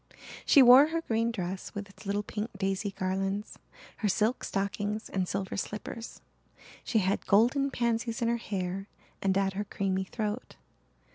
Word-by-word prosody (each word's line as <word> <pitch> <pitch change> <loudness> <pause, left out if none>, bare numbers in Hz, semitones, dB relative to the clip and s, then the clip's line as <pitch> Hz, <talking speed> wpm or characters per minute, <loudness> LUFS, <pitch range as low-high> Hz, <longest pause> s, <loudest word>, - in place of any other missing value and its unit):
She 280 - +8
wore 255 +4 +9
her 330 +1 -1
green 230 -5 0
dress 185 -3 -5
with 200 0 -5
its 200 +1 -14
little 205 +1 0
pink 210 +2 -4
daisy 195 +1 -1
garlands, 195 +2 -3 0.4
her 215 - 0
silk 220 +5 +1
stockings 205 +2 -2
and 185 -2 -1
silver 190 0 -3
slippers. 210 +3 -6 0.6
She 230 - 0
had 195 -1 0
golden 245 +7 +4
pansies 235 -2 -1
in 235 - +1
her 235 0 +2
hair 195 -3 -4 0.3
and 190 -1 +2
at 195 -1 +1
her 200 +2 -2
creamy 190 -2 -1
throat. 215 +3 -4
205 Hz, 155 wpm, -29 LUFS, 195-230 Hz, 0.6 s, wore